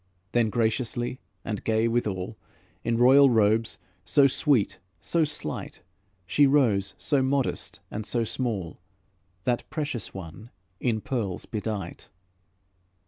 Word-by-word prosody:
Then 120 -2 +2
graciously 120 +2 -1 0.3
and 105 -3 -3
gay 110 0 +2
withal, 105 -6 -1 0.5
In 115 0 0
royal 135 +3 +7
robes, 110 -1 +2 0.3
so 140 - +4
sweet, 135 -4 +2 0.2
so 170 -1 +1
slight, 150 -1 -4 0.4
She 145 +10 +4
rose, 110 -9 +2
so 140 -3 +1
modest 135 0 -1
and 110 - -4
so 115 +2 0
small, 110 -7 -3 0.6
That 120 -1 -1
precious 150 -7 -3
one 95 +4 -9 0.3
in 115 -4 0
pearls 105 -9 -3
bedight. 105 -5 -5
115 Hz, 115 wpm, -27 LUFS, 105-130 Hz, 0.6 s, royal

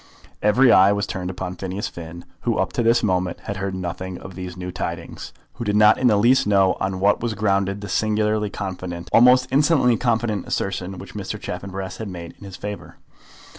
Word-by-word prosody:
Every 120 +5 +5
eye 95 +1 +6
was 100 0 0
turned 90 -1 -4
upon 90 0 -5
Phineas 95 +1 -4
Finn, 85 +1 -9
who - - -1
up - - -1
to - - 0
this 115 +1 +3
moment 90 -3 0
had 100 - -5
heard 95 0 -3
nothing 90 0 -5
of 95 - -10
these 90 0 -7
new 90 0 -5
tidings, 90 - -6 0.2
who 120 - -6
did 105 -2 0
not 105 +1 +6
in 130 - +3
the 105 -3 +4
least 120 +3 +4
know 95 -2 +4
on 95 -1 -2
what 100 +2 +3
was 115 -2 -2
grounded 100 -1 0
the 100 - -6
singularly 105 +1 0
confident, 90 -3 -6
almost 125 +2 +6
insolently 140 -4 +3
confident 115 -4 -1
assertion 95 0 -3
which - - -10
Mr. - - -5
Chaffanbrass 95 -1 -6
had 110 - -5
made 85 -3 -8
in 100 - -11
his 95 -2 -9
favour. 105 0 -7
100 Hz, 200 wpm, -22 LUFS, 95-110 Hz, 0.2 s, eye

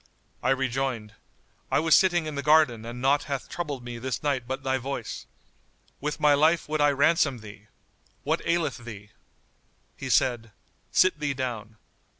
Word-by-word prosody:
I - - 0
rejoined, 130 -4 -1 0.6
"I - - +2
was 160 +1 +3
sitting 175 -3 +4
in 155 - -4
the 140 - -3
garden 145 -6 +3
and 120 +2 -7
naught 145 +2 +3
hath 140 -3 -4
troubled 145 -7 -5
me 120 -1 -7
this 130 +3 -4
night 135 -5 -1
but 135 +1 -4
thy 130 -1 0
voice. 130 -3 -5 0.7
With 150 +1 -3
my 150 -1 +5
life 160 +4 +3
would 155 0 -1
I 145 - +5
ransom 145 -1 +2
thee! 105 0 -12 0.6
What - - 0
aileth 170 -4 0
thee?" 105 -3 -10 0.8
He - - -6
said, 115 -4 +1 0.4
"Sit 185 -4 +3
thee 145 -2 -1
down." 115 -5 -5
135 Hz, 160 wpm, -26 LUFS, 120-150 Hz, 0.8 s, my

